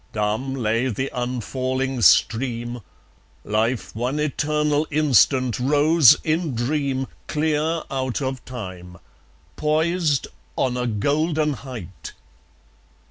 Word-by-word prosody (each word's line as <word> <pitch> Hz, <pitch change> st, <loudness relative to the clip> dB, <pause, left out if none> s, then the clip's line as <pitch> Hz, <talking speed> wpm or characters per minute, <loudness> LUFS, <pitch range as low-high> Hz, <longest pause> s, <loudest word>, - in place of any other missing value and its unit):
Dumb 110 Hz, +6 st, -1 dB
lay 115 Hz, 0 st, 0 dB
the 130 Hz, +3 st, -3 dB
unfalling 130 Hz, +1 st, -2 dB
stream; 120 Hz, +1 st, +2 dB, 0.6 s
Life 110 Hz, +3 st, -1 dB
one 125 Hz, +5 st, -2 dB
eternal 150 Hz, 0 st, 0 dB
instant 130 Hz, -4 st, +3 dB
rose 145 Hz, +1 st, +5 dB
in 155 Hz, -3 st, -1 dB
dream 135 Hz, +2 st, -1 dB, 0.2 s
Clear 155 Hz, +1 st, 0 dB
out 130 Hz, -2 st, -2 dB
of 130 Hz, -2 st, -3 dB
time, 95 Hz, -7 st, -8 dB, 0.6 s
poised 155 Hz, -1 st, +1 dB, 0.3 s
on 125 Hz, -2 st, 0 dB
a 125 Hz, 0 st, -1 dB
golden 150 Hz, +7 st, 0 dB
height. 120 Hz, -10 st, -9 dB
130 Hz, 95 wpm, -22 LUFS, 120-150 Hz, 0.6 s, rose